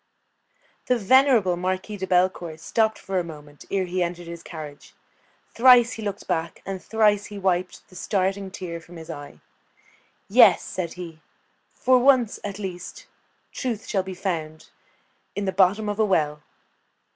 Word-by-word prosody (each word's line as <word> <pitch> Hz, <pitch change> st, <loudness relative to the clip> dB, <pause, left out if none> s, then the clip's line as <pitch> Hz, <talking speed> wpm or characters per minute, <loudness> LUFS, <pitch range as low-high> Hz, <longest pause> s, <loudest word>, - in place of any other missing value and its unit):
The 250 Hz, -, +3 dB
venerable 235 Hz, -4 st, +4 dB
Marquis 185 Hz, +3 st, -3 dB
de 190 Hz, -1 st, -4 dB
Bellecourt 180 Hz, -3 st, +1 dB
stopped 220 Hz, +6 st, +1 dB
for 190 Hz, -1 st, -2 dB
a -, -, -1 dB
moment 150 Hz, -3 st, -11 dB
ere 195 Hz, -1 st, 0 dB
he 180 Hz, +1 st, -2 dB
entered 175 Hz, 0 st, -3 dB
his 170 Hz, 0 st, -8 dB
carriage. 150 Hz, -4 st, -10 dB, 0.6 s
Thrice 245 Hz, 0 st, +6 dB
he 225 Hz, -1 st, -6 dB
looked 205 Hz, -1 st, -4 dB
back, 165 Hz, 0 st, -2 dB
and 190 Hz, -1 st, -5 dB
thrice 210 Hz, -2 st, +2 dB
he 205 Hz, -, -9 dB
wiped 185 Hz, -2 st, -1 dB
the 185 Hz, -, -18 dB
starting 195 Hz, +1 st, -1 dB
tear 170 Hz, -3 st, -6 dB
from 175 Hz, +1 st, -15 dB
his 160 Hz, -1 st, -8 dB
eye. 145 Hz, -1 st, -10 dB, 0.9 s
"Yes," -, -, +6 dB
said 175 Hz, -3 st, -4 dB
he, 165 Hz, -3 st, -9 dB, 0.5 s
"for 255 Hz, 0 st, +4 dB
once, 255 Hz, -3 st, +3 dB
at 200 Hz, -1 st, -5 dB
least, 185 Hz, -4 st, -7 dB, 0.5 s
truth 235 Hz, -5 st, -4 dB
shall 195 Hz, -, 0 dB
be 190 Hz, 0 st, -7 dB
found 160 Hz, -5 st, -4 dB, 0.7 s
in 205 Hz, -, -2 dB
the 190 Hz, -, 0 dB
bottom 195 Hz, +3 st, +3 dB
of 205 Hz, +1 st, -3 dB
a 220 Hz, -, +4 dB
well!" 150 Hz, -6 st, 0 dB
185 Hz, 155 wpm, -24 LUFS, 170-210 Hz, 0.9 s, Thrice